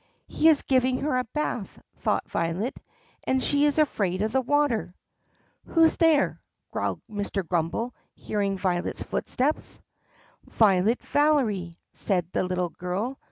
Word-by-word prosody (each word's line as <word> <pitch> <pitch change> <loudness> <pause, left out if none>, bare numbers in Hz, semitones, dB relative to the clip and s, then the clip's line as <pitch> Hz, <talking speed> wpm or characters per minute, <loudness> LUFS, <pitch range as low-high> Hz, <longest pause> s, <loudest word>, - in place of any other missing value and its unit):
"He 320 - +4
is 305 -3 +4
giving 255 -1 +2
her 295 -2 0
a - - 0
bath," 235 -4 -4 0.2
thought - - 0
Violet, 170 +9 -2 0.5
"and 260 - +2
she 285 0 +3
is 295 0 +2
afraid 205 - +1
of 215 - -1
the 265 - +2
water." 260 -8 0 0.7
"Who's 325 -1 +4
there?" 320 -3 +3 0.3
growled - - -2
Mr. 200 -3 -3
Grummbel, 180 +9 -1 0.2
hearing 200 -2 -2
Violet's 180 -2 -1
footsteps. 280 +5 -2 0.7
"Violet 210 +2 +3
Valery," 225 - +1 0.2
said 180 -4 0
the - - 0
little 180 -1 -1
girl. 190 +11 -4
220 Hz, 130 wpm, -26 LUFS, 185-285 Hz, 0.7 s, He